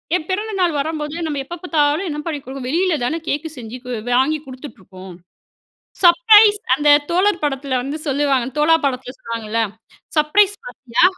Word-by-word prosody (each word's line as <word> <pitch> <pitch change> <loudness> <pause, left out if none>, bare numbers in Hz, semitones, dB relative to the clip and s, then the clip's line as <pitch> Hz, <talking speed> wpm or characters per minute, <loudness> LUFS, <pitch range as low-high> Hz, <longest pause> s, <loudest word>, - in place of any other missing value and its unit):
ஏன் 315 - -2
பிறந்த 420 +3 -2
நாள் 350 -3 +2
வரும்போது, 300 +1 -3
நம்ப 290 -2 -3
எப்ப 345 +5 -7
பாத்தாலும், 310 +1 +1
என்ன 295 -1 -4
பண்ணி 310 -3 -3
குடுக்கோம். 265 0 -7
வெளில 345 +2 +1
தானே 320 +7 -2
கேக்கு 300 +3 -2
செஞ்சு 235 0 -8
கு - - -8 0.3
வாங்கி 300 +4 +1
குடுத்துட்டுருக்கோம். 190 - -11 0.9
"சர்ப்ரைஸ்" 420 +3 +6 0.2
அந்த 295 0 0 0.2
தோழர் 365 0 +1
படத்துல 270 -2 -2
வந்து 280 +4 -5
சொல்லுவாங்கல. 275 -3 0
தோழா 305 +2 +4
படத்துல 255 -2 -3
சொல்லுவாங்கள்ல, 230 -1 -4 0.6
"சர்ப்ரைஸ் 385 +7 +3
பார்ட்டியா?" 245 +2 -1
295 Hz, 150 wpm, -19 LUFS, 260-340 Hz, 0.9 s, சர்ப்ரைஸ்